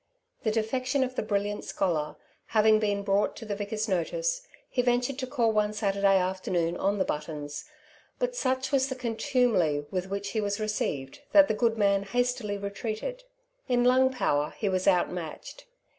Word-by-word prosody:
The 220 - 0
defection 255 +5 0
of 255 0 -3
the - - -1
brilliant 205 -1 -1
scholar 160 -6 -1 0.3
having 215 -1 +4
been 205 -2 0
brought 200 +1 +1
to 225 - -8
the 205 -1 -3
vicar's 215 +2 -3
notice, - - -1 0.2
he 250 - 0
ventured 245 +2 +1
to 255 - -3
call 245 -4 +1
one 210 -1 +1
Saturday 200 -2 +2
afternoon 180 -2 0
on 200 +1 0
the 190 - +1
Buttons, 150 - -4 0.5
but - - -1
such 260 - 0
was 270 -1 +2
the 260 - -3
contumely 230 - +1
with 185 0 -2
which 200 0 -3
he 220 - -1
was 205 0 -1
received 150 -11 -2
that 295 -1 +8
the - - +1
good 230 +1 +1
man 200 -2 +3
hastily 240 0 -1
retreated. 215 - -4 0.4
In 245 -2 +2
lung 260 +1 +5
power 150 - 0
he 210 - -1
was 185 -1 0
outmatched. 180 - -1
215 Hz, 170 wpm, -28 LUFS, 195-250 Hz, 0.5 s, that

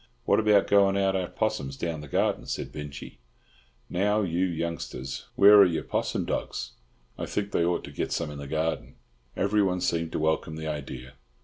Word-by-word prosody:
"What - - +4
about 105 -2 +4
going 100 -1 +4
out 95 -1 +2
after 90 -2 -2
'possums 70 0 -2
down 80 -1 -3
the 75 - -9
garden?" - - 0
said - - -4
Binjie. 75 -3 -8 0.7
"Now, 105 +4 +1
you 90 0 0
youngsters, 80 -6 -4
where 105 +1 +8
are 100 - +9
your 85 -3 -1
'possum - - -1
dogs? - - -3 0.5
I - - -3
think 100 -1 -2
they - - +2
ought 85 +1 0
to 70 - -9
get 70 - -3
some 75 - -2
in 75 - -8
the 70 - -7
garden." 80 +2 -2 0.4
Everyone 100 -2 +2
seemed 85 -2 -1
to - - 0
welcome 80 0 0
the 80 0 -6
idea. 70 -4 -6
85 Hz, 185 wpm, -27 LUFS, 75-95 Hz, 0.7 s, are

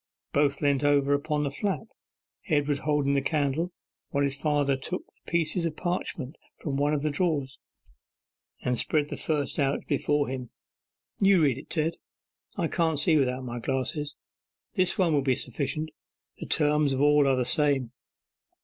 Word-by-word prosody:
Both 140 -1 +2
leant 140 -1 +2
over 145 -1 +3
upon 150 +1 0
the 140 - -1
flap; 195 +10 -2 0.6
Edward 145 -4 +1
holding 145 -2 +1
the 140 - +2
candle, 150 +4 0 0.4
whilst 140 -1 +1
his 140 - -9
father 145 -3 +2
took 155 +7 -5
the - - -17
pieces 170 +1 +1
of 155 - -6
parchment 175 -6 -3 0.2
from 140 -3 -3
one 145 +2 +2
of 145 - -2
the 155 - +1
drawers, 145 -4 -1 1.0
and 125 -1 0
spread 150 -2 +1
the - - -4
first 150 -2 -1
out 140 0 0
before 145 0 +1
him. 125 -2 -5 0.7
'You 195 -4 +5
read 135 -3 +2
it, - - -13
Ted. 160 0 0 0.6
I - - +1
can't 165 -3 +1
see 155 +3 +4
without 130 -3 +1
my 120 -1 -5
glasses. 135 +4 -2 0.6
This 185 -3 +1
one 175 -4 +3
will 145 - +3
be 130 -1 +2
sufficient. 155 +4 -3 0.5
The - - -6
terms 150 -2 +3
of 135 - -1
all 145 -1 +5
are 135 - +4
the 125 -1 0
same. 135 -2 +1
145 Hz, 165 wpm, -27 LUFS, 135-155 Hz, 1.0 s, You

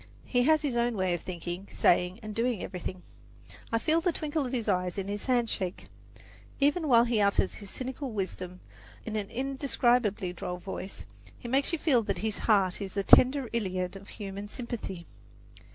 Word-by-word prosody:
He 245 - +2
has 310 +1 +4
his 275 -5 -1
own 235 -1 +1
way 185 -2 +1
of 175 - -2
thinking, 175 +1 -5
saying 180 +1 +2
and 215 0 -5
doing 230 -1 0
everything. 180 0 -5 0.7
I 230 - +3
feel 315 +8 +2
the 355 - +2
twinkle 305 -3 -2
of - - -6
his 240 -4 -2
eye 180 -2 +2
in 195 -1 -2
his 205 +4 -4
handshake. 230 -7 0 0.7
Even 295 +3 +2
while 235 -3 +7
he 235 -3 +1
utters 200 -1 +2
his 200 -2 -9
cynical 260 +3 -5
wisdom 185 -3 -4 0.4
in 220 - -4
an 205 -2 -2
indescribably 245 -7 +1
droll 180 0 -4
voice, 190 +1 -7 0.3
he - - -9
makes 270 +3 +2
you 335 - 0
feel 275 -6 +3
that 200 -4 -2
his 215 -2 -1
heart 195 -3 +3
is 195 0 -5
a 200 - +2
tender 260 +5 +6
Iliad 185 -5 -1
of 195 +1 -10
human 200 -1 -6
sympathy. 215 -7 -6
215 Hz, 180 wpm, -29 LUFS, 190-250 Hz, 0.7 s, while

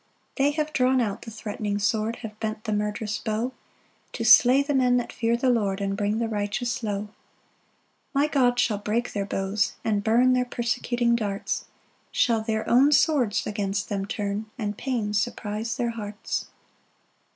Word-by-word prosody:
9 - - -40 0.4
They - - +2
have 305 -1 -2
drawn 255 0 +3
out 210 -5 -1
the 230 - -8
threatening 210 -1 -3
sword, 215 +2 0
Have 215 -1 -8
bent 215 -1 -3
the 215 - -2
murderous 210 +1 -2
bow, 225 +3 -2 0.6
To 230 - -3
slay 245 +5 +7
the 290 +1 -1
men 250 -2 +3
that 240 -1 -3
fear 230 0 +1
the 255 +1 +2
Lord, 205 -5 0
And 195 0 -1
bring 205 +1 0
the 230 0 0
righteous 220 +3 -2
low. 205 -3 -2
10 210 - -7 1.1
My 280 +1 +4
God 250 -4 +2
shall 210 -3 +2
break 220 +4 -1
their 200 -1 -2
bows, 200 +2 0
and 210 -2 +1
burn 240 +4 +4
Their 250 0 +3
persecuting 240 0 0
darts, 205 -3 -2 0.5
Shall 230 -3 +2
their 220 0 -2
own 265 +5 +5
swords 280 -9 +3
against 200 -1 -2
them 195 -1 -2
turn, 205 +1 -3
And 210 -3 -3
pain 230 -4 -2
surprise 215 +1 -2
their 240 -2 0
hearts. 210 -1 -4
220 Hz, 175 wpm, -25 LUFS, 205-245 Hz, 1.1 s, slay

